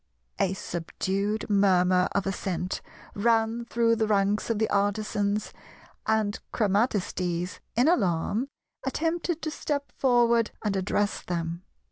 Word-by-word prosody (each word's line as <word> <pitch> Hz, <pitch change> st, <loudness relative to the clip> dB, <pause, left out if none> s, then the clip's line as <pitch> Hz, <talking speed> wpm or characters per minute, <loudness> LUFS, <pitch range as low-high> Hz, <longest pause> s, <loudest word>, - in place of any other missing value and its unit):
A 190 Hz, 0 st, +1 dB
subdued 195 Hz, +5 st, -2 dB
murmur 185 Hz, -3 st, +4 dB
of 200 Hz, -, 0 dB
assent 190 Hz, -2 st, -2 dB, 0.3 s
ran 225 Hz, +2 st, +1 dB
through 230 Hz, -1 st, +2 dB
the 220 Hz, -1 st, +1 dB
ranks 205 Hz, +1 st, +1 dB
of 230 Hz, -, +1 dB
the 220 Hz, +1 st, +2 dB
Artisans, 205 Hz, 0 st, 0 dB, 0.5 s
and 215 Hz, -1 st, +1 dB
Chromatistes, 190 Hz, -5 st, 0 dB, 0.2 s
in 245 Hz, +5 st, +4 dB
alarm, 210 Hz, -, +1 dB, 0.4 s
attempted 330 Hz, +4 st, -1 dB
to 310 Hz, -, -1 dB
step 285 Hz, -2 st, -3 dB
forward 235 Hz, -3 st, +3 dB
and 210 Hz, -2 st, 0 dB
address 205 Hz, +2 st, 0 dB
them. 170 Hz, -1 st, -3 dB
205 Hz, 115 wpm, -27 LUFS, 190-230 Hz, 0.5 s, murmur